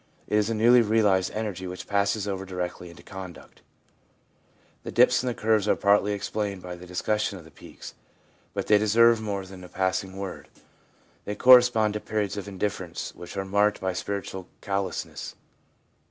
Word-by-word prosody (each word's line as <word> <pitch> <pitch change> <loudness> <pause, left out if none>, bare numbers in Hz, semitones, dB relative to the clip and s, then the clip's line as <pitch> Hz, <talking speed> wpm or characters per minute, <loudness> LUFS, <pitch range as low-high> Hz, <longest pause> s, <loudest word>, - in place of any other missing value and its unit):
It - - -2
is 105 +1 0
a 115 - -1
newly 120 +3 +6
realised 105 -4 +2
energy 100 -4 -4
which 90 0 -7
passes 100 +1 0
over 95 -1 -3
directly 90 -1 -5
into 85 - -14
conduct. 95 -2 -10 1.2
The - - -7
dips - - +4
in 130 - -4
the 120 - -1
curves 110 -1 +1
are - - +4
partly 100 0 +3
explained 100 -1 -3
by 90 -1 -6
the 90 +1 -12
discussion 100 +3 -1
of 85 - -13
the 80 - -16
peaks, - - -12 0.6
but - - -2
they 105 -1 +5
deserve 115 +2 +4
more 100 -3 -3
than 95 -1 -11
a 90 - -11
passing 95 0 -2
word. 95 -1 -6 0.8
They 105 - -3
correspond 125 -3 +6
to 105 - -2
periods 105 -2 -2
of 100 -1 -6
indifference, 95 -3 -4
which 90 +3 -10
are 95 - -2
marked 105 +2 +2
by 95 -1 -2
spiritual 95 -1 -5
callousness. 100 -2 -4
100 Hz, 170 wpm, -26 LUFS, 95-105 Hz, 1.2 s, newly